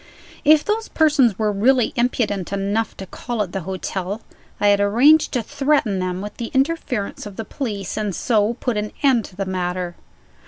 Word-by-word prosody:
If 305 0 +5
those 435 +1 -1
persons 290 - +3
were 215 -1 +1
really 240 +4 +2
impudent 225 -6 0
enough 200 +3 -1
to 190 - -7
call 230 +3 -3
at 185 - -8
the 195 - -3
hotel, 190 +2 -4 0.4
I 205 - +4
had 200 0 +4
arranged 250 +10 +5
to 245 -3 0
threaten 270 -6 +1
them 185 0 -2
with 205 +1 -7
the 235 - -4
interference 265 -9 -1
of 200 - -10
the 225 - -5
police, 205 -9 -4
and 205 -4 -2
so 220 -2 +1
to 240 - -20
put 245 -4 -1
an 210 0 -3
end 255 -6 +4
to 180 - -13
the 195 +1 -3
matter. 180 -1 -3
210 Hz, 190 wpm, -21 LUFS, 195-250 Hz, 0.4 s, If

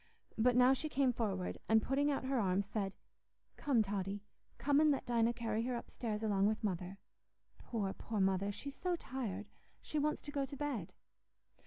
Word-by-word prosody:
But 240 +2 +3
now 250 +1 +7
she 310 +4 -2
came 270 -3 +2
forward, 195 -6 -2
and, 220 0 +7
putting 275 +6 +1
out 280 - 0
her 265 -1 +1
arms, 195 -1 +2
said, 200 -1 -2 0.6
"Come 255 -6 +2
Totty, 200 0 -3 0.3
come 285 0 +3
and 310 0 +6
let 280 - +1
Dinah 235 -1 +2
carry 225 -2 -1
her 245 +1 -1
upstairs 225 -2 -4
along 200 -2 +3
with 215 +1 -1
Mother: 185 -1 -2 0.6
poor, 200 -5 -2
poor 220 -2 -4
Mother! 195 +1 +2
she's 280 +7 -6
so 360 +3 0
tired—she 245 - -5
wants 300 +1 0
to 290 - -6
go 285 -1 0
to 275 +1 -6
bed." 265 - -2
230 Hz, 175 wpm, -36 LUFS, 200-270 Hz, 0.6 s, now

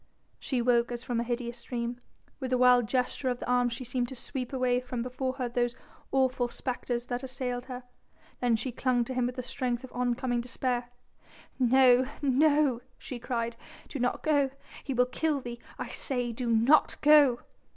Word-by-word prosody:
She 250 -3 -1
woke 240 0 +3
as 240 0 -5
from 245 -3 -1
a - - +1
hideous 240 0 -4
dream. 240 0 -3 0.4
With 260 -2 -4
a 255 - +3
wild 250 -2 +5
gesture 255 +2 0
of 245 - -1
the - - -5
arms 245 -1 +2
she 255 - -5
seemed 245 0 -1
to 265 - -7
sweep 255 0 -4
away 255 -2 +1
from 250 -1 -4
before 255 +1 -2
her 255 -2 -2
those 240 0 0 0.4
awful 260 -2 +2
spectres 245 -1 -3
that 245 0 -3
assailed 255 -2 -4
her. 250 -1 -7 0.6
Then 245 -2 +3
she 250 +3 -2
clung 245 0 +1
to 260 - -5
him 250 -1 +1
with 250 - -5
the 255 - -4
strength 250 -1 -2
of 260 - -9
oncoming 245 0 0
despair. 245 0 -2 0.7
"No 255 0 +5 0.2
no," 285 -2 +3 0.2
she 250 - -7
cried, 235 -1 -2 0.3
"do 280 - -6
not 245 0 0
go... 290 -3 +3 0.3
he 270 - -3
will 250 +1 +4
kill 295 +3 0
thee, 240 -2 -7 0.2
I - - -5
say... 245 -4 -2
do 235 +1 -3
not 230 +7 +4
go...." 290 -5 +6
250 Hz, 185 wpm, -29 LUFS, 240-260 Hz, 0.7 s, go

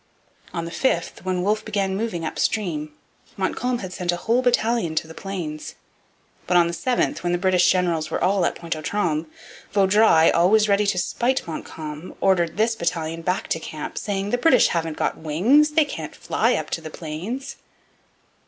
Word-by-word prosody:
On 170 -1 -3
the 170 - -6
5th, 175 -5 -1
when 185 -1 -1
Wolfe 215 +2 +1
began 200 -3 -1
moving 195 -6 -2
up - - -4
stream, 155 -8 -1 0.5
Montcalm 245 +6 -1
had 180 - -8
sent 180 -1 -1
a - - -1
whole 230 +7 +1
battalion 235 -8 +1
to 155 - -1
the 160 - -10
Plains. 165 -5 -6 0.7
But 180 - +4
on 175 - +6
the 170 - -2
7th, 245 +9 0
when 175 0 0
the - - +2
British 180 0 +3
generals 170 -4 +1
were - - -2
all 190 0 +2
at - - 0
Pointe 170 -1 -4
aux 155 - -6
Trembles, 165 -3 -1 0.5
Vaudreuil, 195 -4 +5
always 210 +5 +4
ready 205 0 +2
to 200 - +1
spite 245 +8 0
Montcalm, 155 0 -7
ordered 175 -3 +2
this 225 +1 +2
battalion 165 -3 -2
back 180 +3 -1
to 160 - 0
camp, 155 -2 -7
saying, 200 0 -2
'The 245 - +1
British 325 +6 +5
haven't 165 -2 -2
got - - -1
wings; 235 - +3
they 315 -1 +4
can't 290 - -7
fly - - +1
up - - -4
to 165 - -2
the 160 - -7
Plains!' 210 - -6
180 Hz, 185 wpm, -23 LUFS, 165-215 Hz, 0.7 s, on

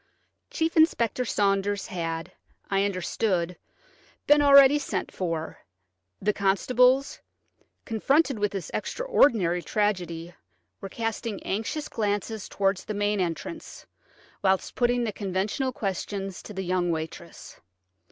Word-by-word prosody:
Chief 325 0 -1
Inspector 255 -7 +3
Saunders 200 -1 0
had, 165 -4 -4 0.4
I 195 0 +2
understood, 185 -2 -1 0.7
been 295 0 +5
already 280 0 +7
sent 205 -9 -3
for; 165 -3 -3 0.6
the 210 +1 +1
constables, 250 +8 +2 0.7
confronted 270 +3 +1
with 205 -1 0
this 195 -3 -5
extraordinary 230 - +2
tragedy, 175 -5 -2 0.5
were 195 - -6
casting 225 -1 -4
anxious 225 +9 -3
glances 210 -1 -2
towards 195 -1 0
the 215 - -4
main 205 0 0
entrance, 185 - -5 0.6
whilst 190 -1 +1
putting 245 0 +1
the 220 -3 -2
conventional 200 +7 -2
questions 195 -3 -4
to - - -10
the 190 - -3
young 180 -1 0
waitress. 160 -1 -6
205 Hz, 115 wpm, -26 LUFS, 185-240 Hz, 0.7 s, already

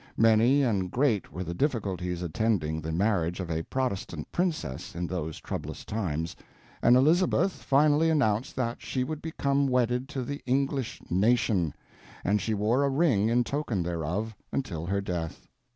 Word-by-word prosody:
Many 115 +5 +5
and 100 -7 +1
great 120 -3 +1
were 90 - -4
the 85 -1 -4
difficulties 90 - -1
attending 85 -3 0
the 80 +1 -4
marriage 90 -1 +1
of 90 -3 -4
a 80 0 0
Protestant 100 -8 -3
princess 155 - -2
in 85 +1 -2
those 80 -3 -4
troublous - - -6
times, 85 -7 -2 0.5
and 120 - +6
Elizabeth 175 +7 +3
finally 150 +1 +3
announced 130 -7 +1
that 120 -2 -2
she 130 - -2
would 155 +3 -4
become 140 -3 0
wedded 125 +1 +1
to 135 -3 -3
the 140 +3 -5
English 135 -1 0
nation, 100 - +2 0.5
and 105 +2 +2
she 110 - -1
wore 110 +7 +2
a 140 - +2
ring 135 -8 +3
in 120 +1 +3
token 120 - -2
thereof 90 +6 -2 0.2
until 85 -12 -3
her 100 +2 0
death. 85 -4 -4
110 Hz, 155 wpm, -28 LUFS, 90-135 Hz, 0.5 s, and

